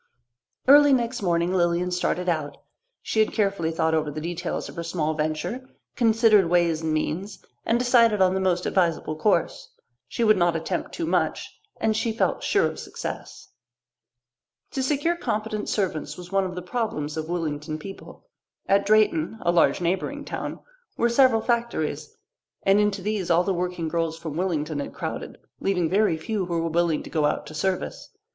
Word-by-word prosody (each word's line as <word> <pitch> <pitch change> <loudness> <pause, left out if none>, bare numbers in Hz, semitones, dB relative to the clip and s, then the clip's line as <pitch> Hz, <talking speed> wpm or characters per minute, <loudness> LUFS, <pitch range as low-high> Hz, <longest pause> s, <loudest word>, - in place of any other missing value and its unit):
Early 290 +1 +8
next 240 -1 0
morning 175 -1 +1
Lilian 175 0 +1
started 180 0 -1
out. 155 -4 -1 0.5
She 220 - -1
had 215 - +3
carefully 195 -6 0
thought 160 0 0
over 155 -1 +1
the 150 +1 -5
details 170 +2 -4
of - - -11
her 170 - -4
small 165 -2 -1
venture, 155 +12 -3 0.3
considered 220 -5 +4
ways 170 -2 +2
and 160 -1 -1
means, 175 +6 -3 0.2
and 230 - +3
decided 235 -3 +4
on 185 -1 +4
the 190 - 0
most 180 -2 +1
advisable 165 -4 0
course. 170 +1 0 0.4
She 235 - -2
would 215 -2 +5
not 175 -2 +2
attempt 165 +2 -3
too 335 - -3
much, - - -1 0.2
and 220 -1 +1
she 225 +1 0
felt 220 - 0
sure - - +2
of - - -3
success. - - -7 1.2
To 270 - -2
secure 290 +5 +1
competent 215 -8 -3
servants 160 -7 -2
was 180 0 -10
one 195 -1 +2
of 180 -1 -5
the 180 - -5
problems 180 -8 -3
of 155 0 -4
Willington 155 -2 -3
people. 195 +5 -11 0.4
At 200 0 +3
Drayton, 215 -3 +3
a 175 - +3
large 175 +1 +3
neighbouring 190 +12 -2
town, - - -5 0.4
were 235 - +2
several 235 -2 +4
factories, 235 -10 -2 0.5
and 195 +1 +4
into 205 -2 +1
these 205 -3 -2
all 170 +1 +4
the 195 - 0
working 180 -2 -2
girls 165 0 -1
from 160 -2 -6
Willington 155 -3 -1
had 140 - -6
crowded, - - -5 0.2
leaving 180 -4 0
very 200 -4 +3
few 190 +3 -3
who 170 -1 -1
were 165 - -1
willing 170 -1 +1
to - - -10
go 155 -2 +1
out 150 - 0
to 150 - -10
service. 185 +5 -3
180 Hz, 175 wpm, -25 LUFS, 165-215 Hz, 1.2 s, Early